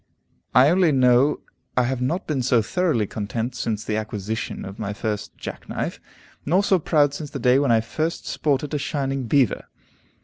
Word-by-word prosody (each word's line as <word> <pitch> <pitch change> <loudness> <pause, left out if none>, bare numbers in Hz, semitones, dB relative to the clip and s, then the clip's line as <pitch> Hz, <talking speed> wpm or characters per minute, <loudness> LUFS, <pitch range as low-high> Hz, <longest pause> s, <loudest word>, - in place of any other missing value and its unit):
I 130 +4 +7
only 180 -2 +4
know 130 +1 +4 0.4
I 125 - +5
have 125 0 -1
not 165 +10 -1
been 145 -4 -1
so 120 -2 +3
thoroughly 160 - +1
content 110 +4 -4
since 110 -3 -3
the 105 - -2
acquisition 110 0 -4
of 95 +2 -9
my 105 -2 -3
first 105 0 -4
jackknife; - - -5 0.4
nor 180 +7 +2
so 190 -2 +3
proud 145 -3 +2
since 150 0 -6
the - - -5
day 125 +1 +4
when 140 -4 +2
I 115 -1 +4
first 155 +8 -3
sported 145 0 -1
a 150 - 0
shining 135 -3 -2
beaver. 130 -2 +2
130 Hz, 175 wpm, -23 LUFS, 110-150 Hz, 0.4 s, I